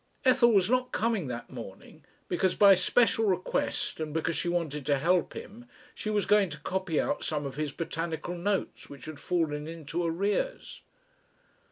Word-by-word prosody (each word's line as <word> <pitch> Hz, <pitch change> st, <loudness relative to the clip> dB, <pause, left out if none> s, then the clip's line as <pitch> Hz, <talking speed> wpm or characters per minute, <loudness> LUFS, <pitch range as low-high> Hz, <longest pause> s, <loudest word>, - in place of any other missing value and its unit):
Ethel 255 Hz, -2 st, +5 dB
was 195 Hz, -4 st, +4 dB
not 250 Hz, +2 st, +1 dB
coming 220 Hz, -8 st, 0 dB
that 120 Hz, -1 st, -6 dB
morning, 115 Hz, -7 st, -10 dB, 0.2 s
because 185 Hz, +1 st, +1 dB
by 200 Hz, -1 st, +8 dB
special 225 Hz, +4 st, +3 dB
request 185 Hz, -4 st, -1 dB
and 155 Hz, -1 st, -4 dB
because 165 Hz, 0 st, 0 dB
she 175 Hz, -, -1 dB
wanted 160 Hz, -4 st, -2 dB
to 145 Hz, -1 st, +3 dB
help 175 Hz, +5 st, +1 dB
him 240 Hz, +4 st, -10 dB, 0.3 s
she 215 Hz, -, -5 dB
was 205 Hz, -3 st, +1 dB
going 205 Hz, -3 st, +4 dB
to 150 Hz, -1 st, -8 dB
copy 185 Hz, -2 st, -1 dB
out -, -, -1 dB
some 150 Hz, -2 st, -2 dB
of 135 Hz, -, -4 dB
his 150 Hz, 0 st, -3 dB
botanical 165 Hz, +2 st, -4 dB
notes 190 Hz, +3 st, -2 dB
which 140 Hz, -3 st, -11 dB
had 155 Hz, -2 st, -8 dB
fallen 155 Hz, -4 st, -1 dB
into 165 Hz, +1 st, -4 dB
arrears. 200 Hz, -, -2 dB
175 Hz, 170 wpm, -29 LUFS, 155-205 Hz, 0.3 s, by